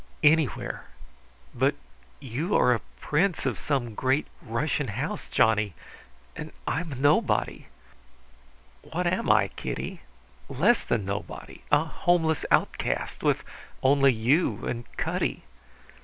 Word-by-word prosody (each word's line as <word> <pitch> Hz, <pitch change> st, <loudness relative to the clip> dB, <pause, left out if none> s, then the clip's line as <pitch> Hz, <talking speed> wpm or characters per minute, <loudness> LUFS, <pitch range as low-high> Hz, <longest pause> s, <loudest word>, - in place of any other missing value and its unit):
"Anywhere. 150 Hz, -2 st, +2 dB, 0.7 s
But -, -, +2 dB, 0.4 s
you 140 Hz, -, -2 dB
are 125 Hz, -, +5 dB
a 115 Hz, -, -1 dB, 0.2 s
prince 170 Hz, +4 st, +1 dB
of -, -, -1 dB
some 130 Hz, -6 st, -1 dB
great 130 Hz, +6 st, +1 dB, 0.2 s
Russian 145 Hz, +2 st, -1 dB
house, 135 Hz, -, -4 dB
Johnny, 110 Hz, -, +2 dB, 0.6 s
and -, -, -7 dB
I 145 Hz, -, 0 dB
am 160 Hz, -5 st, -6 dB
nobody." 145 Hz, +2 st, +2 dB, 1.1 s
"What 180 Hz, +3 st, -3 dB
am 175 Hz, -7 st, 0 dB
I, 105 Hz, -2 st, +5 dB
Kitty? -, -, -5 dB, 0.5 s
Less 175 Hz, -, +3 dB
than 110 Hz, -5 st, -1 dB
nobody 100 Hz, +2 st, -6 dB
a 145 Hz, +1 st, +5 dB
homeless 160 Hz, -1 st, +1 dB
outcast, -, -, 0 dB
with -, -, +1 dB, 0.4 s
only 135 Hz, 0 st, +5 dB
you 125 Hz, +9 st, +1 dB
and 120 Hz, -1 st, -4 dB
Cutty. -, -, -1 dB
140 Hz, 115 wpm, -27 LUFS, 115-160 Hz, 1.1 s, are